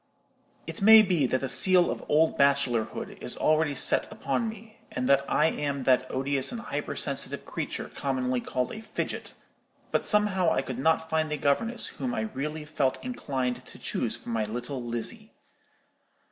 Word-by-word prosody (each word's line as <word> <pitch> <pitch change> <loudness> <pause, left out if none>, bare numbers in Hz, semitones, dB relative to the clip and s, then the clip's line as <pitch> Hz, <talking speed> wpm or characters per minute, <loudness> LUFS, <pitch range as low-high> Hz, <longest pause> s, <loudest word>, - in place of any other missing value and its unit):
"It 225 - -7
may 220 +2 +9
be 175 -9 +2
that 130 +1 0
the 135 - -1
seal 180 +5 +4
of - - -5
old 160 +2 +3
bachelorhood 140 -5 +1
is - - -2
already 155 -2 +2
set 130 - +2
upon 225 +1 -2
me, 220 0 -12
and 125 0 -2
that 140 0 +4
I 150 - +3
am 140 -3 -1
that 130 0 +3
odious 135 0 0
and 240 - -5
hyper 230 - -4
sensitive - - -3
creature - - -4
commonly 130 -2 -1
called 125 0 -2
a 215 - -7
'fidget;' 220 - -4 0.6
but - - +1
somehow 205 -5 +3
I - - +1
could 130 -2 -5
not 160 +3 +2
find 160 -1 0
a 150 - -1
governess 225 - 0
whom 245 -2 -4
I - - -1
really 150 -7 -4
felt 140 -4 0
inclined 135 - -3
to - - -13
choose - - -3
for - - -11
my 115 -2 0
little 120 +5 -5
Lizzie. 120 - -4
145 Hz, 175 wpm, -27 LUFS, 130-190 Hz, 0.6 s, may